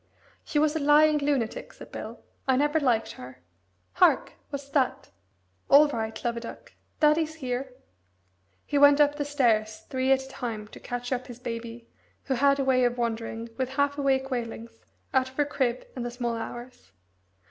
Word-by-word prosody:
"She - - -3
was 300 +1 +3
a - - +1
lying 300 +1 +5
lunatic," 280 - -1
said - - -13
Bill. - - -7 0.3
"I 260 - +4
never 295 +4 +2
liked 240 -6 +1
her. 125 0 -11 0.6
Hark! - - +3 0.2
what's 280 -1 -6
that? 270 -1 0 0.6
All 295 +2 +8
right, 220 -4 -4
Love 235 0 0
a - - -1
duck 230 - -10 0.3
daddy's 310 +1 +3
here!" 260 -3 -4 0.9
He 290 - 0
went 285 0 +7
up 290 -1 +5
the 295 0 -2
stairs 225 -7 +1
three 260 0 +1
at 265 0 +3
a - - -11
time 230 -5 -5
to - - -12
catch 245 +1 -5
up 255 0 -2
his 245 -2 -9
baby, 235 -1 -6 0.4
who 270 - -1
had 275 +2 +3
a - - +2
way 255 -1 +3
of 245 0 +1
wandering, 230 -1 -3
with 260 -1 -1
half 285 0 +2
awake 270 -1 0
wailings, 230 -2 -5 0.3
out 260 -1 +2
of 260 - -20
her 295 - +3
crib 255 -4 -1
in 250 - -4
the 240 - -3
small 240 -1 -3
hours. 240 - -8
260 Hz, 180 wpm, -27 LUFS, 235-285 Hz, 0.9 s, All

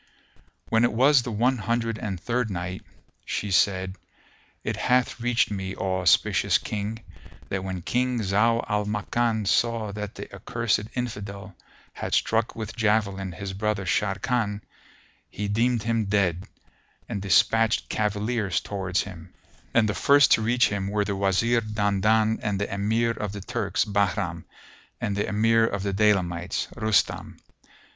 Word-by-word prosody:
When 115 +1 +3
it 120 - +3
was 135 +3 +5
the 120 - -5
One 120 +4 +1
Hundred 115 +1 -1
and 100 -7 -4
Third 120 +3 -1
Night, 90 0 -4 0.4
She 100 - -3
said, 95 0 +2 0.7
It - - -2
hath 125 0 +1
reached 120 -2 +1
me, 95 -1 -4
O 95 -1 -1
auspicious 90 - +3
King, 110 +2 -5 0.5
that 95 -1 -2
when 95 -2 -5
King 125 +3 0
Zau 110 +4 +2
al 105 -1 0
Makan 110 +1 0
saw 115 0 +1
that 105 0 -6
the 100 0 -9
accursed 105 +2 -1
Infidel 100 -6 -5 0.4
had - - -2
struck 115 0 +1
with 110 -2 -6
javelin 105 -4 0
his 95 +3 -6
brother 105 0 -1
Sharrkan, 105 +2 0 0.7
he 105 - -4
deemed 115 +2 +1
him 115 -1 0
dead, 95 -3 +1 0.6
and 100 - -4
despatched 110 +4 +3
cavaliers 105 -1 -1
towards 95 -1 -2
him; 90 -3 -11 0.4
and 115 -2 +3
the 105 - 0
first 140 +4 +5
to - - +5
reach 120 +2 +3
him 100 -2 -2
were 105 0 0
the 100 0 -2
Wazir 100 +5 +2
Dandan 110 +1 +1
and 100 -2 -1
the 100 - -3
Emir 110 +4 +1
of 105 -3 -4
the 100 - -6
Turks, - - -1
Bahram, 100 -4 -1 0.5
and 100 - -2
the 105 - -1
Emir 115 +2 +3
of 100 -2 -3
the 100 -1 -1
Daylamites, 95 -4 +1
Rustam. 110 -4 0
105 Hz, 150 wpm, -25 LUFS, 100-115 Hz, 0.7 s, was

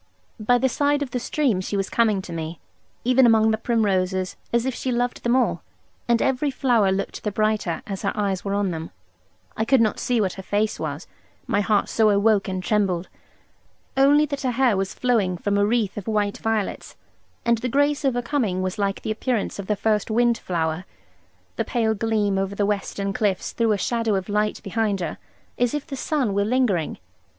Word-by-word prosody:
By 245 +3 +3
the 265 - +2
side 285 +2 +1
of 265 - -7
the 250 - -1
stream 245 -6 0
she 200 +2 -3
was 195 -1 -1
coming 215 -5 +1
to 175 - -8
me, 165 0 -5 0.4
even 255 +1 +5
among 220 -1 +4
the 220 - +1
primroses, 190 -5 0 0.2
as 235 0 +1
if 265 - -1
she 255 - -3
loved 245 0 -1
them 240 +1 +2
all; 255 -2 +1 0.5
and 235 -1 +3
every 265 +2 +1
flower 240 -7 +2
looked 195 +1 -3
the 210 - -1
brighter, 215 -5 0
as 195 -2 -5
her 200 - 0
eyes 195 -3 -1
were 200 0 -1
on 200 -2 0
them, 160 0 -5 0.7
I 220 - 0
could 265 +3 +4
not 220 -3 +2
see 245 -2 +1
what 190 -4 0
her 190 - -8
face 205 +3 -1
was, - - -4 0.4
my 205 - +1
heart 205 -1 +2
so 220 -1 +3
awoke 205 0 +3
and 185 -1 -3
trembled; 190 -4 0 0.9
only 285 +3 +5
that 280 -1 -4
her 260 - 0
hair 250 -3 +3
was 190 0 -2
flowing 215 -8 +1
from 205 +4 -1
a 200 - +3
wreath 220 -3 0
of 205 - -6
white 210 -2 0
violets, 220 -2 -2 0.5
and 235 -1 +3
the 250 - -2
grace 285 +3 +2
of 265 -3 +1
her 245 - -1
coming 220 -9 0
was 185 +3 -3
like 200 -1 -1
the - - -2
appearance 220 -1 -2
of 195 - -5
the 210 - +1
first 210 +1 0
wind 235 +1 +3
flower. 160 -1 -2 0.7
The - - +1
pale 225 -3 +1
gleam 210 -2 0
over 195 +1 -2
the 205 - +1
western 200 -1 -2
cliffs 195 -3 0
threw 230 -2 +1
a 210 - +2
shadow 230 +1 0
of 190 +1 -3
light 210 +1 0
behind 210 -1 0
her, 170 -3 -4 0.4
as 245 +2 +1
if 295 - -3
the 275 - -6
sun 265 -6 -1
were 200 +1 +2
lingering. 215 - +1
215 Hz, 205 wpm, -23 LUFS, 195-240 Hz, 0.9 s, even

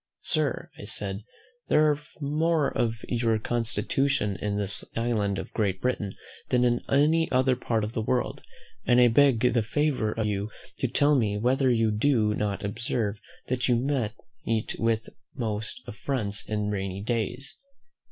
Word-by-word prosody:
"Sir," - - 0
said 100 -1 -2
I, 105 - -12 0.4
"there 150 0 +5
are 145 - -1 0.2
more 155 +1 +1
of 115 -3 -1
your 115 -2 +1
constitution 115 0 0
in 100 +3 -2
this 100 -1 -1
island 110 -4 0
of - - -6
Great 100 -4 0
Britain 105 -5 -1 0.3
than 125 -1 +3
in 120 -1 +2
any 155 +4 +3
other 130 0 +3
part 115 -3 -1
of 105 +2 -4
the 115 - -1
world: 120 +2 -1 0.4
and 120 0 +4
I 120 -1 +7
beg 130 -1 +4
the 120 - +3
favour 125 -1 0
of 110 0 -1
you 105 0 -1 0.3
to 130 - +1
tell 145 +4 +4
me 110 -7 +2
whether 130 +4 +2
you 115 -3 +3
do 110 -1 +2
not 105 -1 -2
observe 105 0 -2 0.3
that 125 -1 -1
you 125 - +4 0.7
meet 110 -1 -1
with 115 -1 +1 0.3
most 110 -1 -3
affronts 105 -1 -3
in 105 -1 -1
rainy 95 -1 -3
days?" 120 +4 -3
115 Hz, 155 wpm, -27 LUFS, 105-130 Hz, 0.7 s, I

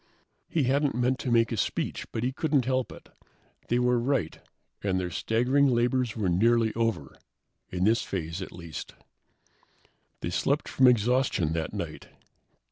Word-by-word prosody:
He 160 - +1
hadn't 140 +1 +1
meant 125 +1 +1
to 125 - -2
give 115 -1 +3
a 115 - -2
speech, - - -2
but 110 - -3
he 125 - 0
couldn't 145 -2 +1
help 130 -1 0
it. - - -13 0.6
They 120 - +1
were 125 0 +2
right, 120 - -1 0.4
and 95 -2 0
their 90 -1 -3
staggering 125 - +2
labors 125 -1 +1
were 105 -4 0
nearly 110 +5 +3
over, 115 - -2 0.5
in 90 0 -2
this 110 +3 +3
phase, 85 -1 -4
at 95 - -6
least. 85 -2 -8 1.3
They 85 - -3
slept 140 - 0
from 130 - +4
exhaustion 120 -8 +2
that 80 -1 -2
night. - - -6
120 Hz, 155 wpm, -27 LUFS, 95-130 Hz, 1.3 s, from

